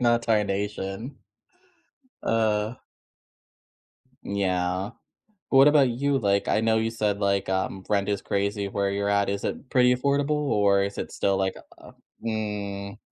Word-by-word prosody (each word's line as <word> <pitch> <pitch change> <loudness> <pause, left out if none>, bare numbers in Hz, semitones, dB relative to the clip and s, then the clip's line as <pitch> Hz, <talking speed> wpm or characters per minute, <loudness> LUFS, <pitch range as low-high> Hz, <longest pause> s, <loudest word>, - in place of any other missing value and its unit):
Not 120 -1 +3
tarnation. 105 +1 -1 1.1
Uh 110 0 +1 1.5
Yeah. 95 -1 -1 0.6
What 135 +1 +6
about 145 -3 +5
you? 135 +3 0
Like, 100 -4 +1
I - - +2
know 110 0 +2
you 110 0 +1
said, 105 -3 -1
like, 100 -1 +1
um, 95 0 -2
rent 100 -1 +1
is 100 -1 0
crazy 100 0 -1
where 100 0 -1
you're 100 +1 -1
at, 100 -1 +2
is 100 0 -3
it 130 - -4
pretty 125 -1 +4
affordable, 140 +3 0
or 105 -10 +2
is 100 0 -4
it - - -4
still, 100 -1 0
like, 95 0 0 0.2
u - - -17
uh - - -12 0.3
mm. 105 -2 -4
105 Hz, 145 wpm, -25 LUFS, 100-115 Hz, 1.5 s, What